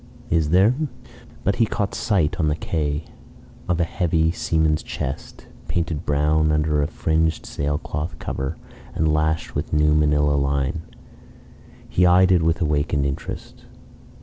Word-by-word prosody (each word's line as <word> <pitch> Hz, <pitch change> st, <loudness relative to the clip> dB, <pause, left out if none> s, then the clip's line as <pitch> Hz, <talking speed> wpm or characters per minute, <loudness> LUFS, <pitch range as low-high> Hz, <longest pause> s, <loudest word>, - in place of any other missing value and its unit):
"Is 80 Hz, -2 st, +2 dB
there?" 95 Hz, +8 st, +5 dB, 0.7 s
But 100 Hz, -, +1 dB
he 115 Hz, -2 st, +3 dB
caught 100 Hz, -1 st, -2 dB
sight 90 Hz, -4 st, 0 dB
on 80 Hz, -, +2 dB
the 75 Hz, -, +1 dB
quay 75 Hz, -2 st, -2 dB, 0.7 s
of 90 Hz, -1 st, +1 dB
a -, -, +3 dB
heavy 80 Hz, -2 st, +1 dB
seaman's 80 Hz, -3 st, +1 dB
chest, 65 Hz, -, -6 dB, 0.2 s
painted 85 Hz, -2 st, -2 dB
brown 75 Hz, +2 st, +2 dB
under 75 Hz, -1 st, +1 dB
a 70 Hz, -, +1 dB
fringed 80 Hz, +1 st, 0 dB
sailcloth 75 Hz, +3 st, -3 dB
cover, 65 Hz, 0 st, -4 dB, 0.4 s
and 80 Hz, -1 st, +2 dB
lashed 80 Hz, +1 st, 0 dB
with -, -, -3 dB
new 75 Hz, 0 st, +4 dB
manila 75 Hz, -1 st, +3 dB
line. 70 Hz, +2 st, 0 dB, 1.1 s
He 90 Hz, 0 st, +3 dB
eyed 90 Hz, +1 st, +5 dB
it 90 Hz, -2 st, +4 dB
with 80 Hz, +2 st, +1 dB
awakened 75 Hz, -2 st, +1 dB
interest. 70 Hz, 0 st, -6 dB
80 Hz, 140 wpm, -22 LUFS, 75-85 Hz, 1.1 s, there